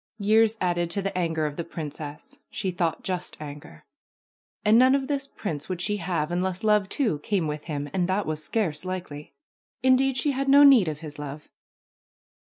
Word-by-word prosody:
Years 220 +1 +3
added 175 -2 0
to 195 +3 -2
the 195 -1 -3
anger 165 -3 0
of 150 -1 -4
the 170 - -2
princess; 160 - -8
she 195 -3 -3
thought 170 -2 -1
just 180 -1 -4
anger. 145 - -10 0.8
And 215 +2 +6
none 260 +2 +6
of 270 -1 -1
this 280 -1 -2
prince 155 - -5
would 185 -2 -3
she 205 +4 -1
have 170 -4 -2
unless 180 +2 -2
love, 210 -2 +3
too, 220 - 0
came 185 +2 -1
with 150 0 -4
him, 145 -3 -4
and 180 -2 +1
that 195 +2 0
was 155 0 -3
scarce 175 -9 -1
likely. 175 -6 -6 0.5
Indeed, 260 0 +3
she 290 - +1
had 275 0 -1
no 285 +1 +8
need 265 - +7
of 150 -1 -4
his 150 -2 -9
love 150 +1 -8
180 Hz, 185 wpm, -26 LUFS, 155-220 Hz, 0.8 s, no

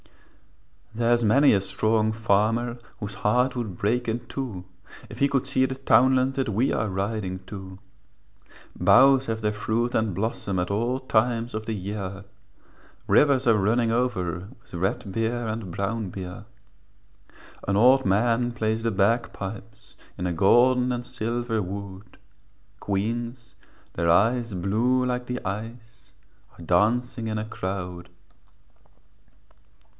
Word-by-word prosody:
There's 120 +1 +2
many 135 +7 +5
a 100 - +2
strong 110 +3 +1
farmer 115 +2 +1 0.2
Whose 105 -2 -5
heart 125 +6 +1
would 110 -8 -4
break 120 +6 0
in 115 +2 -2
two 115 -8 -5 0.4
If - - -10
he 140 - +3
could 135 -2 0
see 130 - +2
the 130 0 -3
townland 130 0 +3
That 135 -3 -1
we 110 +6 +1
are 105 0 -1
riding 95 -1 -3
to; 95 -2 -9 1.0
Boughs 130 +8 +5
have 110 -1 -2
their 105 -1 0
fruit 115 +3 -1
and 110 -4 0
blossom, 100 -1 -2
At 90 +1 -1
all 120 +5 0
times 120 -1 0
of 110 0 -5
the 115 - -1
year, 100 0 -5 0.8
Rivers 140 -3 +4
are 115 -2 +5
running 115 +3 +2
over 95 -7 -1
With - - -25
red 95 +2 -2
beer 115 +3 -1
and 110 -4 -4
brown 100 +2 -2
beer. 90 +2 -8 1.2
An 100 0 +1
old 130 +4 +5
man 115 +5 +2
plays 110 -1 -1
the 115 - +1
bagpipes 105 0 -2 0.2
In 90 - -3
a 90 - -1
golden 125 +8 +4
and 120 0 -3
silver 120 -2 -2
wood, 100 +1 -8 0.6
Queens, 115 +4 -3 0.4
their 85 0 0
eyes 115 +4 +2
blue 115 +8 +1
like 125 0 -2
the 125 0 -3
ice, 115 +3 -7 0.5
Are 85 - -11
dancing 115 +6 +1
in 110 0 -2
a 105 - -3
crowd. 90 -4 -5
110 Hz, 135 wpm, -25 LUFS, 100-120 Hz, 1.2 s, many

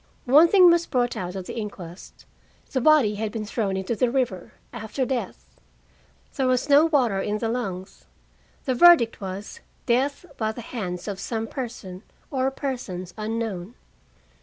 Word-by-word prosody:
One 290 +6 +7
thing 365 -1 +7
was 340 0 +2
brought 245 -1 0
out 180 0 -5
at 190 -1 -5
the - - -7
inquest: 195 -5 -8 0.5
the 260 - 0
body 295 -7 +5
had 220 -1 -2
been 220 -1 -4
thrown 205 -3 -2
into 190 +5 -2
the 245 +3 +1
river 235 -8 -2 0.2
after 220 +5 -3
death. 255 -1 -4 0.9
There 265 -2 +1
was 255 +1 +1
no 290 +2 +6
water 245 -11 +2
in 210 +2 -1
the 225 - -2
lungs. 195 -6 -5 0.6
The 260 - +1
verdict 285 -7 +6
was 195 - -6 0.3
"death 270 +7 0
by 220 -1 -1
the 240 - -8
hands 185 -7 -5
of 200 -2 -4
some 225 +2 -3
person 225 -7 -7 0.3
or 265 -1 +1
persons 240 -11 -5
unknown." 220 -2 -4
230 Hz, 160 wpm, -24 LUFS, 195-265 Hz, 0.9 s, One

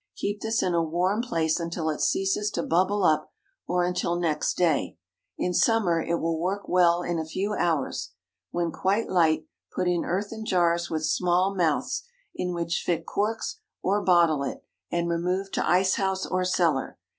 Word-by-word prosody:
Keep 205 0 -3
this 220 0 0
in 180 - 0
a 170 - +3
warm 180 +6 0
place 165 -10 0
until 170 -1 -3
it 150 - -5
ceases 195 +2 +1
to 170 - -3
bubble 190 +4 +1
up, 155 -2 +2 0.4
or 180 0 +1
until 175 -1 0
next 155 -3 0
day. 165 - +1 0.4
In 180 - -1
summer 185 -6 +3
it 170 - -1
will 165 -1 -1
work 190 +4 -2
well 175 -1 +3
in 175 -1 -1
a - - -1
few 190 +6 -3
hours. 165 -8 -1 0.4
When 170 -1 -1
quite 200 +7 0
light, 165 -4 +2 0.3
put 180 - 0
in 175 -1 +1
earthen 205 +5 -3
jars 170 -4 +1
with 155 -1 -1
small 180 +4 +2
mouths, 185 - 0 0.3
in 180 - -3
which 170 -1 -1
fit 165 -2 -1
corks, 220 +2 -2 0.2
or 200 +2 +2
bottle 170 -5 +4
it, 140 - -4 0.3
and 170 0 0
remove 180 +3 -1
to - - -1
ice 185 +1 +4
house 190 -1 0
or 185 0 -1
cellar. 165 -7 +1
175 Hz, 175 wpm, -26 LUFS, 170-190 Hz, 0.4 s, bottle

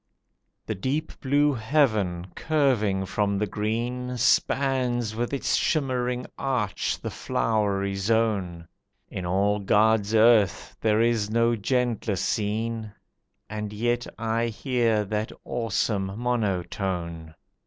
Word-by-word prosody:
The - - -2
deep 140 +10 -2
blue 145 +2 +2
heaven, 110 - +1
curving 120 -11 +1
from 100 +1 0
the 105 - +1
green, 120 +5 -2
Spans 125 -2 +1
with 120 +1 -2
its 140 - -1
shimmering 125 -5 0
arch 125 -9 -1
the - - -5
flowery 100 -3 0
zone; 95 -4 0 0.4
In 90 -2 -5
all 100 +3 +1
God's 105 +1 +3
earth 110 -4 +4
there 110 0 +3
is 115 -3 +1
no 115 +1 +2
gentler 115 -1 0
scene, 110 +3 -2 0.6
And 105 -1 -5
yet 120 +3 -1
I 115 +1 0
hear 115 -2 0
that 105 +2 -2
awesome 105 -3 -1
monotone. 90 -7 -2
110 Hz, 110 wpm, -26 LUFS, 100-120 Hz, 0.6 s, earth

